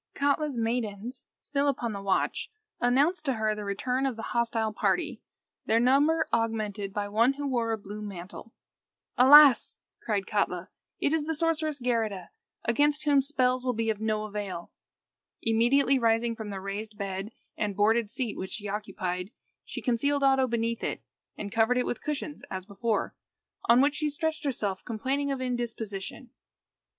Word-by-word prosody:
Katla's 285 -1 +1
maidens, 230 +1 -2
still 285 0 -1
upon 245 -4 0
the 200 - -5
watch, 195 -1 0 0.3
announced 285 +8 +2
to 270 - +2
her 220 -2 0
the 210 0 -6
return 250 +7 -1
of 260 - -2
the 225 - -7
hostile 230 -2 0
party, - - 0 0.5
their 225 - +4
number 285 +6 +3
augmented 215 -3 -1
by 205 +1 -2
one 230 +6 +3
who 285 +1 -5
wore 235 -4 0
a 225 - 0
blue 210 +1 -8
mantle. 200 +2 -8 0.6
"Alas!" 275 +1 +8 0.2
cried 205 -3 -1
Katla, 185 -4 -1 0.3
"it 290 - +1
is 315 -2 +1
the 320 0 -1
sorceress 315 -2 0
Geirrida, 225 -7 -1 0.4
against 290 +5 +2
whom 290 -2 +4
spells 255 -2 +1
will 255 -1 0
be 225 0 +1
of 215 -1 -6
no 215 -1 0
avail." 205 -5 -5 0.7
Immediately 245 +4 +3
rising 230 0 +2
from 220 -2 -6
the 195 -1 -4
raised 205 +3 -5 0.6
and 205 -2 -2
boarded 215 +2 +3
seat 230 -1 -3
which 190 - -5
she 205 -1 -5
occupied, 190 -3 -3 0.3
she - - -7
concealed 280 +3 +1
Oddo 270 -1 +4
beneath 230 -1 -1
it, - - -3 0.3
and 205 -1 -5
covered 230 +3 +3
it 250 - +1
with - - -3
cushions 300 0 -4
as 185 -1 -5
before, 215 +2 -1 0.5
on 235 +2 +6
which 285 +1 +3
she 305 0 -1
stretched 320 +1 -3
herself 205 -8 -2
complaining 265 +5 -2
of 270 -1 -2
indisposition. 235 -2 -4
230 Hz, 160 wpm, -28 LUFS, 210-275 Hz, 0.7 s, Alas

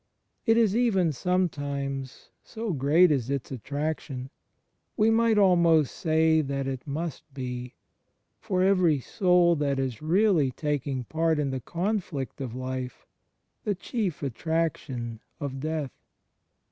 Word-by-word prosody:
It 225 0 +5
is 220 -3 +3
even 200 -9 +3
some 180 +6 +1
times 140 -3 -5
(so 225 -4 -4
great 155 +5 +4
is 130 -4 0
its 140 -2 -3
attraction) 140 0 -4 0.3
— - - -49
we 220 +1 +4
might 225 -1 +3
almost 170 -7 +4
say 160 -2 +3
that 140 -1 -2
it 130 -1 -5
must 155 +1 -5
be 125 -2 -5 0.3
— - - -49
for 185 -4 0
every 185 -6 +4
soul 180 - +3
that 140 -2 0
is 130 -4 -2
really 170 -3 +3
taking 140 -1 -2
part 160 +5 0
in 145 -2 0
the 130 -1 -3
conflict 170 - -3
of 125 -3 -5
life, 130 -1 -5 0.6
the 205 - 0
chief 195 - -3
attraction 135 -5 -2 0.2
of 140 -3 -4
death. 155 -2 -2
150 Hz, 135 wpm, -27 LUFS, 135-180 Hz, 0.6 s, It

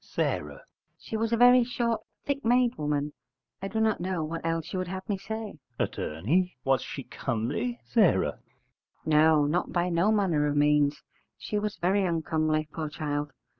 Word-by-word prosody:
S. - - +1 0.6
She - - -7
was 225 +1 0
a 230 - +2
very 245 +1 +7
short 235 -1 -1 0.2
thick 280 0 -2
made 245 +1 +3
woman: 150 0 -2 0.5
I 195 - -3
do 220 +3 -2
not 220 -3 +1
know 180 -2 -1
what 165 +2 -5
else 165 -1 -2
you 185 - -1
would 185 - -3
have 190 +1 -6
me 205 - 0
say. 215 -3 -6 0.2
Att. - - -1 0.6
Was 135 -1 +2
she - - -6
comely? 220 - -3 0.2
S. 180 - +5 0.8
No, 155 -1 +5
not 170 +5 0
by 175 0 0
no 175 +5 +2
manner 180 -9 +2
of 145 - -1
means: 145 0 +3 0.3
she 210 - -2
was 210 0 -3
very 190 +3 +2
uncomely, 155 -3 0
poor 155 -2 -3
child! 145 -1 -3
175 Hz, 170 wpm, -28 LUFS, 150-220 Hz, 0.8 s, very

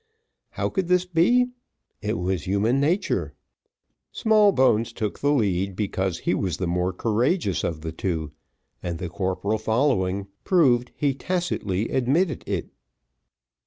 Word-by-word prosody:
How - - -1
could 190 -3 -1
this 180 0 +3
be? 190 +9 +3 0.5
It 105 -2 -1
was 90 0 -2
human 105 +7 +2
nature. 170 +8 0 0.8
Smallbones 155 - +3
took 110 -4 -3
the 145 - +2
lead, 100 -7 +1
because 95 -3 -2
he - - +1
was 95 -2 -1
the 95 - -2
more 90 +1 0
courageous 115 - 0
of 80 -2 -2
the 80 0 -4
two, 80 -3 -3 0.5
and 85 -1 -3
the 90 +1 -5
corporal 95 +4 -1
following, 110 -5 +1 0.2
proved 125 -9 +3
he 145 -2 +1
tacitly 130 - -2
admitted 140 +5 +1
it. - - -3
110 Hz, 130 wpm, -24 LUFS, 95-150 Hz, 0.8 s, this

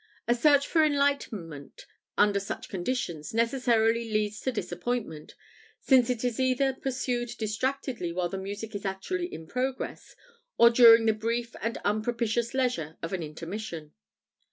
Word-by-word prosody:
A 240 - +4
search 285 +3 +4
for 320 +1 +3
enlightenment 275 - -1 0.3
under 205 -1 +4
such 200 - -6
conditions 175 -4 -3
necessarily 230 -1 +2
leads 215 0 0
to 260 - -1
disappointment, 235 -8 -4 0.4
since 255 -3 +4
it 245 -2 -1
is 245 -1 -1
either 260 +1 +2
pursued 250 -2 -2
distractedly 235 -2 -2
while 175 +1 -1
the 190 +2 -5
music 205 +3 -6
is 205 - -5
actually 350 - -3
in 160 - -8
progress, 255 +7 -4 0.4
or 235 0 +7
during 230 -1 +8
the 220 - +4
brief 230 +2 -3
and 230 +1 -2
unpropitious 230 +3 0
leisure 240 - -1
of 165 - -4
an 185 - -2
intermission. 165 +1 -6
230 Hz, 140 wpm, -28 LUFS, 200-255 Hz, 0.4 s, during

